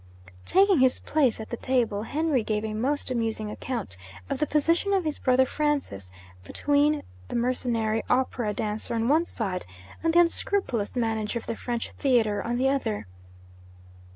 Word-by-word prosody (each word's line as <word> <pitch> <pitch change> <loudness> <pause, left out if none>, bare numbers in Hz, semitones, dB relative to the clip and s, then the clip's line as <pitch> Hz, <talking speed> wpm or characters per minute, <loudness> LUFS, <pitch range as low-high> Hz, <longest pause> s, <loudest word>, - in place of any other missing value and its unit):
Taking 385 -3 +5
his 255 -1 +4
place 275 -8 +1
at 220 - -8
the 235 - -3
table, 235 -6 0
Henry 295 +2 0
gave 215 0 -1
a 215 - -3
most 265 +5 -1
amusing 225 -3 -1
account 230 - -4 0.3
of - - -1
the 300 - +1
position 335 +7 +2
of 385 -2 +2
his 310 -2 -3
brother 260 0 +4
Francis 275 - -2 0.3
between 290 - +1 0.2
the - - -5
mercenary 235 -3 0
opera 250 -4 +1
dancer 215 +2 -2
on 225 0 0
one 320 +4 +4
side, 195 - -3 0.4
and 330 - +3
the 340 - +5
unscrupulous 335 - +1
manager 225 -2 -1
of 235 - -6
the 230 - -3
French 240 -1 -4
theatre 225 -7 +2
on 240 +1 -2
the 260 +2 +2
other. 110 - -1
245 Hz, 160 wpm, -26 LUFS, 220-290 Hz, 0.4 s, Taking